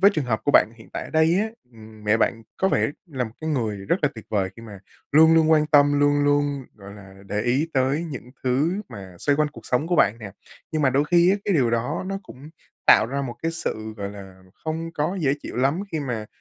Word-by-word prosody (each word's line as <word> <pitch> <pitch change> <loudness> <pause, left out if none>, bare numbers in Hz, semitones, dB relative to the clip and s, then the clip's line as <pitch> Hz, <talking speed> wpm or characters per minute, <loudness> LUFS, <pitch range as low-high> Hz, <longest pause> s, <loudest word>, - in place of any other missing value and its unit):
với 200 +2 +7
trường 150 -4 -1
hợp 110 -3 -1
của - - +2
bạn 115 - +5
hiện 110 - -16
tại - - -4
ở - - -10
đây 160 +2 +3
á, 220 - -1 0.2
ừm, 110 -1 -14
mẹ 105 +1 +3
bạn 115 0 0
có 190 - +2
vẻ - - +1 0.2
là 130 -6 -3
một 110 - -7
cái 160 - -3
người 115 -8 -1
rất 100 - 0
là 145 - +4
tuyệt 110 - -10
vời 95 -3 0
khi 115 - -11
mà 105 -4 -10 0.3
luôn 160 +2 +7
luôn 160 -1 +4
quan 155 -1 +4
tâm, 145 -1 +4
luôn 145 0 +3
luôn, 145 -1 +1
gọi 100 -1 -12
là, 95 -2 -13
để 105 +1 -2
ý 135 +7 +1
tới 135 +5 +1
những 130 -6 -8
thứ 150 +11 +1
mà 95 -6 -10
xoay 145 +7 +1
quanh 150 0 +2
cuộc 115 -5 -13
sống 125 +5 0
của 175 -1 0
bạn 105 -1 +3
nè. 100 -4 -8 0.4
Nhưng 155 -1 0
mà 130 - +4
đôi 140 +3 +2
khi 175 +3 +4
á 195 - +3
cái 200 - +1
điều 125 -6 +3
đó 125 +10 -1
nó 195 0 -3
cũng 145 -3 -13 0.4
tạo 110 - +7
ra 140 +3 -3
một 125 -3 -5
cái 165 - 0
sự, 110 -9 -4
gọi 100 -1 -5
là, 95 -2 -12 0.2
không 165 +1 -3
có 155 +6 -1
dễ 140 -2 +2
chịu - - -7
lắm 135 +7 +1
khi 160 - -1
mà 120 -6 -4
140 Hz, 255 wpm, -23 LUFS, 110-155 Hz, 0.4 s, với